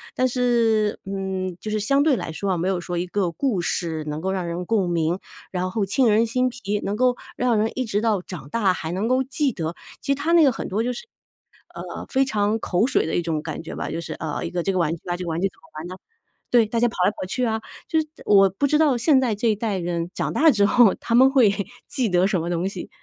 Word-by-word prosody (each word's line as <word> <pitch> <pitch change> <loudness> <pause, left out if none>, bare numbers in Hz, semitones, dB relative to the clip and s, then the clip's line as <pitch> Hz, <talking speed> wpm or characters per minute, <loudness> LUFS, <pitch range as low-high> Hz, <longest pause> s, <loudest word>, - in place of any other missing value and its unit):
但 255 - +2
是， 235 -4 +1
嗯， 190 -2 -3
就 215 - -5
是 215 - 0
相 275 +7 +2
对 300 -4 +4
来 160 - -4
说 195 +5 -2
啊， 180 - 0
没 175 +3 -1
有 190 -2 0
说 175 +1 -4
一 175 - -1
个 180 -2 -1
故 235 - -1
事 160 -3 -2
能 150 0 -3
够 190 +1 -1
让 185 -2 -2
人 170 +1 -3
共 205 -4 +1
鸣， 170 +1 0 0.3
然 185 0 -2
后 210 -1 0
沁 240 +7 +2
人 220 +1 +4
心 250 +2 +1
脾， 210 -4 -3
能 200 - -2
够 250 +2 +2 0.2
让 245 -2 +2
人 220 +1 +1
一 255 - -1
直 210 -2 -1
到 215 -5 +1
长 165 -7 -9
大 200 -3 +2
还 160 -2 -5
能 190 +5 -1
够 255 +2 +2
记 280 +1 0
得。 165 0 -4 0.3
其 280 - -1
实 - - +3
他 310 +4 -1
那 335 -2 +7
个 275 - +5
很 - - -5
多 210 +4 -1
就 250 - -1
是， 250 - -8 0.7
呃， - - -7
非 270 0 +2
常 215 -2 0
口 185 +2 +1
水 275 - +1
的 - - -2
一 175 - +2
种 160 -2 -2
感 155 0 -5
觉 165 - -7
吧。 - - -4
就 165 +2 -3
是， 160 -1 -6
呃， 155 -2 -4
一 - - -3
个 175 -1 -2
这 195 - +1
个 185 - -1
玩 165 -1 +1
具 165 - -15
啊， 175 - 0
这 180 - -5
个 175 - -4
玩 165 +1 -2
具 195 - +3
怎 190 - -14
么 - - -41 0.2
玩 165 - -6
呢， 185 - -7 0.6
对， 235 -2 +5
大 230 +2 -3
家 240 - +4
跑 - - -11
来 - - +3
跑 205 - -6
去 250 +6 -1
啊， 220 -1 -1 0.3
就 325 -6 +2
是 310 - -8 0.2
我 195 -1 +6
不 195 +10 0
知 300 - +3
道 295 -5 +3
现 270 +3 +4
在 240 -4 +1
这 225 +3 +1
一 215 - +2
代 210 -2 -2
人 170 -1 -2
长 - - -2
大 320 +1 +5
之 205 -5 +3
后， 230 -2 +5
他 230 - -2
们 260 +2 +7
会， 245 -7 +5 0.4
记 245 -5 0
得 180 +1 +3
什 190 -4 0
么 170 - -3
东 175 +2 -1
西？ 185 -3 -7
205 Hz, 295 characters per minute, -23 LUFS, 180-245 Hz, 0.7 s, 那